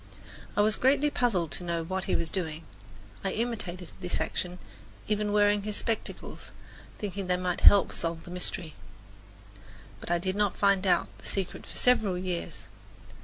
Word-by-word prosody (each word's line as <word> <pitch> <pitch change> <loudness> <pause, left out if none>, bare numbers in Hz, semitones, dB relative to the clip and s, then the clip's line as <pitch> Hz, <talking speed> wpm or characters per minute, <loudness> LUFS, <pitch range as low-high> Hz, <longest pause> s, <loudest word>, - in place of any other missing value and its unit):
I - - +6
was 215 +1 +3
greatly 285 +3 +3
puzzled 190 - +1
to 180 - -2
know 170 -1 -1
what 185 +3 -2
he - - +1
was 165 - 0
doing. 165 -4 -3 0.6
I 195 - -1
imitated 210 -7 -3
this 180 -1 -1
action, 180 0 -2 0.5
even 210 -1 0
wearing 205 0 +4
his 210 0 -3
spectacles, 225 -1 -4 0.5
thinking 200 -2 -4
they 180 0 +2
might 180 -1 -2
help 200 - +7
solve 165 -1 -3
the 175 - -10
mystery. 180 -2 -2 1.3
But - - -8
I 175 - +3
did 185 +2 -1
not 205 -1 +1
find 200 -1 +3
out 180 - +3
the - - -10
secret 195 -2 -3
for - - -9
several 220 -7 +3
years. 180 -1 -4
190 Hz, 165 wpm, -29 LUFS, 175-210 Hz, 1.3 s, help